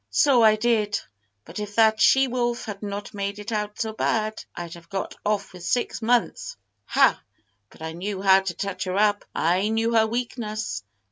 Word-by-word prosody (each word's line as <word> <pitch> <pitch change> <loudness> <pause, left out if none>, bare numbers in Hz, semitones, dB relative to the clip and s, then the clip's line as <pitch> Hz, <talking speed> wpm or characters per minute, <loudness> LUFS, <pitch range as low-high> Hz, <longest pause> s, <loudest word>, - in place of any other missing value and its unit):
"So 275 -5 +4
I 215 -1 +6
did; 215 -2 +1 0.5
but - - -8
if 205 -1 -6
that 220 -1 +4
she 270 0 +5
wolf 240 -1 -1
had 205 -3 -7
not 205 -1 -5
made 200 0 -3
it 210 +2 -7
out 210 -1 -3
so 220 -1 -2
bad, 215 0 -1
I'd 170 -1 -6
have 170 -1 -13
got 195 -1 -3
off 205 -2 -1
with 180 -1 -11
six 240 +7 -1
months. 235 - 0 0.3
Ha! - - +3 0.5
but - - -14
I 160 - -4
knew 190 +4 -4
how 190 0 +6
to 190 -3 -4
touch 200 +1 -3
her 185 +1 -2
up. 205 0 +2
I 180 +5 +2
knew 225 +1 +1
her 220 -1 +4
weakness! 220 - -3
210 Hz, 190 wpm, -24 LUFS, 195-225 Hz, 0.5 s, I